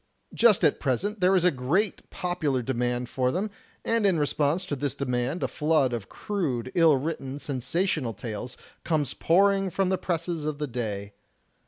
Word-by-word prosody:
Just 230 -4 +5
at 145 - +3
present 195 - -1
there 185 +1 +4
is 180 - +3
a 180 - +5
great 160 +10 -1
popular 155 -8 -1
demand 125 0 -1
for 125 +1 0
them; 200 +6 -2 0.3
and 230 -1 +1
in 195 -4 +3
response 150 +3 +1
to 145 - -2
this 140 0 -2
demand 125 +4 -1
a - - +2
flood 150 -5 +1
of 110 -5 -4
crude, 135 - -3
ill 165 -5 +5
written, 135 -2 -4
sensational 145 - -1
tales 115 +3 -6 0.3
comes 150 -5 0
pouring 195 +2 +3
from 185 +1 0
the 190 - 0
presses 170 -2 -2
of 150 -1 -2
the 150 - -2
day. 105 -6 -4
150 Hz, 170 wpm, -27 LUFS, 125-180 Hz, 0.3 s, Just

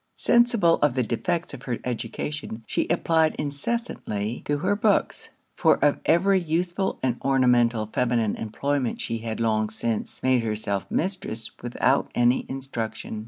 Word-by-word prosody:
Sensible 235 -8 +3
of 145 -4 +3
the 130 - +2
defects 170 - -2
of 135 - -8
her 125 -3 -3
education, 120 +1 -4
she - - -1
applied 160 -2 +2
incessantly 140 - -3
to 145 - 0
her 185 +7 +1
books; 205 -1 +1 0.3
for - - +4
of 145 - +3
every 190 +3 +4
useful 175 +3 -1
and 125 -2 +1
ornamental 125 -4 +3
feminine 115 -1 0
employment 130 +4 -2
she 115 0 -3
had 110 -1 -4
long 110 -2 +1
since 110 0 -3
made 130 -2 +3
herself 105 -3 -2
mistress 135 - -2
without 125 +3 +1
any 120 +1 +2
instruction. 120 -5 -5
130 Hz, 140 wpm, -25 LUFS, 115-165 Hz, 0.3 s, for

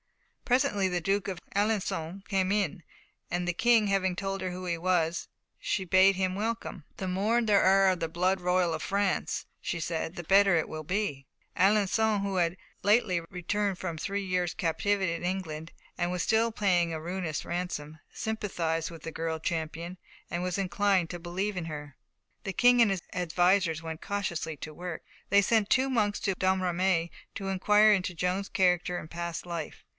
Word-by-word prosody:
Presently 245 -7 +2
the 180 -1 0
Duke 195 +3 0
of 185 -3 -4 0.2
Alençon 200 -3 -1
came 190 -2 +1
in, 200 -3 0 0.5
and 175 0 -2
the 175 - +1
King 225 +2 +4
having 190 -2 +1
told 195 0 -3
her 185 -1 -2
who 185 +1 -6
he 170 -1 -1
was, 170 -1 0 0.3
she 190 - -1
bade 190 +2 +5
him 185 -1 0
welcome. 220 -5 -3
"The 190 - -3
more 205 +6 +1
there 210 -3 +4
are 195 +1 +5
of 185 -2 0
the 165 - -1
blood 180 +3 +1
royal 180 -1 +2
of - - -3
France," 200 -1 0 0.2
she 170 - -3
said, 165 +1 -3
"the 175 - -6
better 195 0 +5
it 160 - 0
will 155 0 -6
be." 160 -6 -2 0.3
Alençon, 205 +2 +3
who 200 -1 -2
had 175 0 +1 0.3
lately 205 -4 +3
returned 195 +2 -1
from 175 -3 -4
a - - -8
three 200 +3 -2
years' 180 -2 0
captivity 190 +2 0
in 170 - -5
England, 170 -3 -3 0.3
and 175 0 0
was 180 -1 -1
still 225 +1 +2
paying 180 -6 +2
a 160 - -3
ruinous 170 -1 -3
ransom, 170 -3 -4
sympathised 170 -7 -2
with 165 -2 -11
the 165 - -5
girl 160 0 -3
champion, 165 +2 -3 0.3
and 175 +1 -2
was 180 0 -1
inclined 190 -2 +1
to 175 - -5
believe 185 +4 -3
in 180 -2 -3
her. 150 -3 -7 0.5
The 195 - -3
King 245 +2 +5
and 220 -4 +5
his 190 -2 -1
advisers 175 -1 +2
went 160 -1 -6
cautiously 170 -6 -3
to 155 - -8
work. 175 +1 -6 0.3
They 200 +1 +5
sent 215 0 +2
two 265 +1 +3
monks 210 -5 +1
to 195 - +1
Domremy 185 -2 +1 0.3
to 195 - -4
inquire 210 +3 +5
into 185 -2 0
Joan's 180 +3 -1
character 180 -1 +2
and 155 - -7
past 170 0 -4
life. 170 -3 -6
185 Hz, 180 wpm, -29 LUFS, 170-200 Hz, 0.5 s, bade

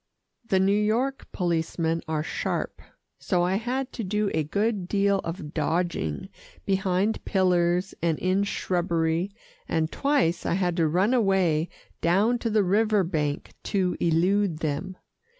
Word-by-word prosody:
The 195 -5 +1
New 190 +1 +3
York 225 +6 0
policemen 165 -2 -1
are 155 -1 -1
sharp, - - -3 0.4
so 180 -3 +1
I 185 +2 +1
had 255 +4 -3
to 230 - -4
do 210 +1 0
a 155 - +1
good 200 +4 -1
deal 200 0 +2
of 165 -3 -6
dodging 160 - -1 0.4
behind 195 +2 0
pillars 180 -1 +2
and 165 -2 +1
in 185 +2 +1
shrubbery, 170 -2 0 0.4
and 160 -1 0
twice 275 - +1
I - - 0
had 180 -2 0
to 165 -2 +3
run 185 +9 +2
away 190 -8 +2 0.3
down 205 +8 +3
to 230 - -1
the 215 -1 +3
river 210 +2 +3
bank 150 -4 -2
to 185 -3 0
elude 175 +2 +2
them. 165 +4 -3
185 Hz, 140 wpm, -26 LUFS, 165-205 Hz, 0.4 s, New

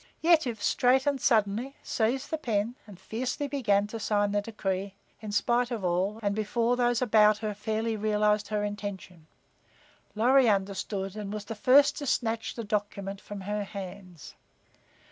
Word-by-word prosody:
Yetive 315 -9 +3
straightened 265 +4 +2
suddenly, 225 +3 +1
seized 255 +6 -1
the 320 - 0
pen 225 -3 -1
and 195 -4 -12
fiercely 250 +8 -3
began 220 -8 +1
to 225 +2 -7
sign 205 -1 +1
the 205 0 +1
decree, 200 -2 -3 0.2
in 215 -1 -7
spite 240 +4 +1
of 225 -6 -3
all 185 +5 0
and 200 0 +1
before 230 +3 0
those 245 0 +1
about 215 -2 +5
her 215 -1 -3
fairly 220 +2 -2
realized 210 0 +1
her 210 -1 -1
intention. 200 -5 -6 0.9
Lorry 250 +3 +5
understood, 195 0 -2
and 210 -2 -5
was 210 -1 -5
the 225 - -5
first 280 +6 +4
to 285 - -5
snatch 225 -3 -1
the 230 - -5
document 200 -1 -3
from 205 -1 -8
her 205 +2 -2
hands. 190 -4 -9
210 Hz, 155 wpm, -28 LUFS, 200-240 Hz, 0.9 s, about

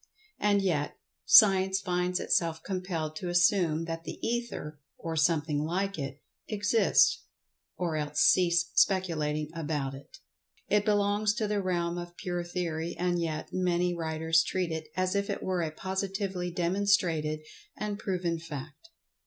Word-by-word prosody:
And 205 -1 +2
yet, 155 -6 -1 0.3
Science 190 -3 +7
finds 180 -1 -1
itself 160 -2 0
compelled 180 -5 -3
to 180 - -4
assume 175 -2 +3
that 165 0 -5
the - - -7
Ether, 230 -11 -4 0.2
or 165 -1 -4
"something 150 -2 +1
like 190 +3 -2
it" 135 0 -6 0.2
exists, 210 +1 +3 0.5
or 170 -3 -1
else 150 -1 -2
cease 170 -2 +4
speculating 155 -5 +1
about 145 -4 -3
it. 135 +1 -12 0.5
It 205 0 +2
belongs 205 0 +2
to 220 -3 -1
the 205 -1 0
realm 175 -2 -1
of 175 0 -9
pure 175 -1 -3
theory, 170 -2 -3
and 175 -1 0
yet, 155 -2 -3
many 180 -1 +1
writers 160 -1 +1
treat 180 0 -2
it 160 -1 -4
as 185 0 +1
if 200 0 -1
it - - -3
were 185 -2 0
a 160 - -1
positively 190 +1 -3
demonstrated 175 -4 +1 0.4
and 210 0 -3
proven 180 -5 -2
fact. 150 - -9
175 Hz, 145 wpm, -29 LUFS, 160-190 Hz, 0.5 s, Science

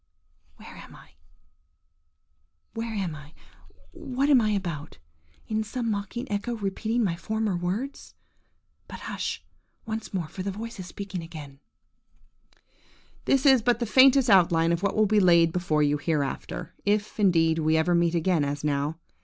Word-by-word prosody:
'" 85 +1 -42
–Where - - -13
am - - -13
I?–where 80 - -14
am 190 -5 -2
I?–what 260 - -7
am 260 -4 +6
I 215 - +1
about? 170 - -4 0.5
Is 215 -1 -2
some 230 0 -2
mocking 205 +4 -4
echo 205 +4 -2
repeating 220 +3 -1
my 175 -5 0
former 220 +2 -2
words? 195 +11 -4 0.7
But, - - -9
hush - - -4 0.4
once 220 0 -5
more, 180 -5 -3
for 185 - -8
the 195 - -3
voice 220 +2 -7
is 180 - -7
speaking 195 0 -6
again:– 150 -4 -10 1.7
"This 270 0 +2
is 265 -3 +6
but 240 +1 +2
the 235 - -2
faintest 265 +3 +5
outline 170 -5 +4
of 170 0 0
what 200 -1 0
will 215 - +4
be 210 +1 +3
laid 170 -3 +5
before 160 -4 +1
you 145 0 +1
hereafter, 155 +2 -3
if, 210 +1 -1
indeed, 165 -5 +3
we 155 0 +2
ever 165 +3 +2
meet 170 0 +2
again 170 -2 +1
as 145 0 -3
now. 145 +1 -1
185 Hz, 155 wpm, -26 LUFS, 160-220 Hz, 1.7 s, am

